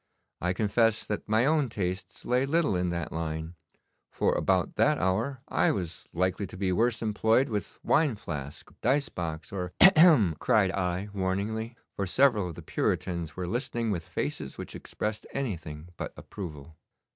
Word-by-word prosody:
I 90 +1 +1
confess 110 +2 +2
that 105 0 -4
my 110 +3 +4
own 150 -3 +2
tastes 95 -3 -4
lay 125 +2 +2
little 160 - +2
in 90 0 0
that 85 -1 -3
line, 80 0 -4 0.6
for - - +1
about - - +1
that - - +4
hour 105 +8 0
I - - +2
was 90 -4 -5
likely 95 +3 0
to - - -10
be 95 -1 0
worse 115 +4 +1
employed 110 +5 +2
with 105 -3 -4
wine 150 -6 +3
flask, 70 -8 -7
dice 140 +4 +2
box, 80 -2 -5
or 90 -2 -4
' - - -49
'Hem! 190 - +10
hem!' 150 - +6
cried 95 -4 +3
I 90 +1 -2
warningly, 105 +4 -2 0.2
for 100 - -2
several 110 -4 +3
of 85 - -8
the - - -9
Puritans 85 -3 -1
were 90 - -3
listening 115 +2 -2
with 85 -5 -3
faces - - -4
which - - -7
expressed 105 0 -4
anything 85 - -4
but - - -5
approval. 80 -5 -8
100 Hz, 170 wpm, -28 LUFS, 90-115 Hz, 0.6 s, Hem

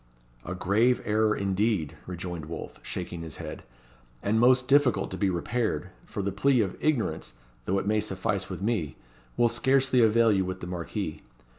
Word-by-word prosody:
"A 90 - -5
grave 110 +7 +2
error 110 0 +2
indeed," 100 -4 0
rejoined 85 -3 -5
Wolfe, 80 0 -7
shaking 90 -2 -5
his 80 -3 -6
head, - - -7 0.6
"and 110 +2 +2
most 125 +1 +5
difficult 140 -2 +3
to - - -3
be 100 - +1
repaired 95 0 -1 0.2
for 100 - -4
the 100 - -1
plea 125 +5 +3
of 95 -4 -2
ignorance, 130 - 0 0.3
though 95 - +1
it 95 - -1
may 105 +1 +2
suffice 95 -3 -2
with - - -5
me, 105 -10 -1 0.4
will 120 - +5
scarcely 130 +2 +3
avail 115 0 +5
you 95 -2 +2
with 95 0 -4
the - - -6
Marquis. 90 -2 -4
105 Hz, 170 wpm, -27 LUFS, 90-120 Hz, 0.6 s, most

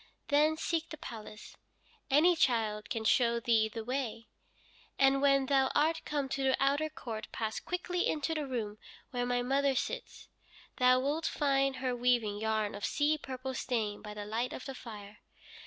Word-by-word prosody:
Then 305 +2 +4
seek 330 0 -1
the 310 - -7
palace 225 -7 -9 0.5
any 315 +6 +5
child 220 -7 +1
can 225 -2 -2
show 235 +1 +3
thee 225 -2 +2
the 225 0 -6
way 240 -2 -3 0.7
and 275 0 +4
when 275 -1 +4
thou 265 -1 +3
art 320 +2 +2
come 290 -2 -1
to 270 +1 -2
the 265 -1 +3
outer 285 +3 +2
court 230 -7 -6
pass 220 -1 -3
quickly 360 0 -2
into 310 +1 -1
the 305 -3 -2
room 215 -5 -4 0.3
where 245 -1 -1
my 245 0 +1
mother 275 +1 +2
sits. - - -4 0.5
Thou 255 0 +5
wilt 300 +4 0
find 275 -2 +1
her 255 -1 -1
weaving 240 -4 +1
yarn 220 -1 0
of 205 - -8
sea 295 +1 +2
purple 260 -1 -5
stain 225 -5 -2
by 210 -1 -8
the 205 -1 -5
light 230 +4 -2
of - - -7
the 270 - -5
fire. 210 -4 -10
255 Hz, 170 wpm, -32 LUFS, 225-285 Hz, 0.7 s, any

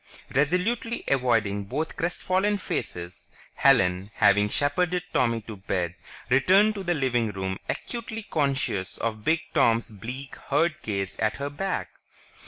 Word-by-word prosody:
Resolutely 180 - +1
avoiding 115 -6 +1
both 150 +10 -3
crestfallen 185 +4 0
faces, 90 - -5 0.2
Helen, 95 -8 +3
having 105 0 +4
shepherded 175 +8 +1
Tommy 115 -2 +2
to 110 -1 -9
bed, 90 -3 -2 0.4
returned 190 +11 +5
to 200 - -5
the 175 -1 +1
living 120 -5 +1
room 95 -1 -3
acutely 225 -2 -4
conscious 135 - -1
of 110 -2 -3
Big 160 +5 +2
Tom's 115 0 +3
bleak, 125 +6 -7
hurt 155 +3 +1
gaze 100 -3 -3
at 110 -1 +1
her 140 +1 -3
back. 190 +6 -2
130 Hz, 130 wpm, -26 LUFS, 105-175 Hz, 0.4 s, returned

